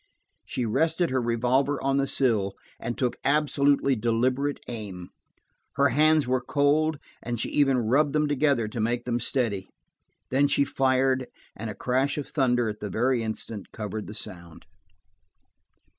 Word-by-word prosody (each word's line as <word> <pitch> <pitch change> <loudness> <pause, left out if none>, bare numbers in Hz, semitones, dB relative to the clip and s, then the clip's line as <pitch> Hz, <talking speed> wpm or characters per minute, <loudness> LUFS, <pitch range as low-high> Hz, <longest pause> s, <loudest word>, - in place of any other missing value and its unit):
She 125 - -2
rested 160 +8 +1
her 130 -1 +1
revolver 125 +4 +1
on 135 0 0
the 140 0 +1
sill 110 -9 +1 0.2
and 120 +1 -4
took 125 -2 -1
absolutely 140 -1 +2
deliberate 125 +5 0
aim. 100 -7 -7 0.7
Her 140 0 +4
hands 155 +1 +4
were 130 0 0
cold, 145 +4 +2 0.2
and 120 -1 -4
she - - -2
even 135 -3 +3
rubbed 135 +5 +2
them 150 0 +2
together, 140 -5 +1
to 110 +2 -6
make 120 +2 -1
them 120 -1 0
steady. 110 -6 -1 0.6
Then 140 +2 +4
she 140 0 +2
fired, 130 -1 +1 0.3
and 110 +1 -5
a 105 - -6
crash 130 +7 0
of 145 - -4
thunder 125 -4 +1
at 105 0 -4
the 105 - -5
very 120 +5 +1
instant 110 -1 -5
covered 105 -1 -5
the 105 - -8
sound. 85 -6 -8
130 Hz, 155 wpm, -26 LUFS, 115-140 Hz, 0.7 s, Her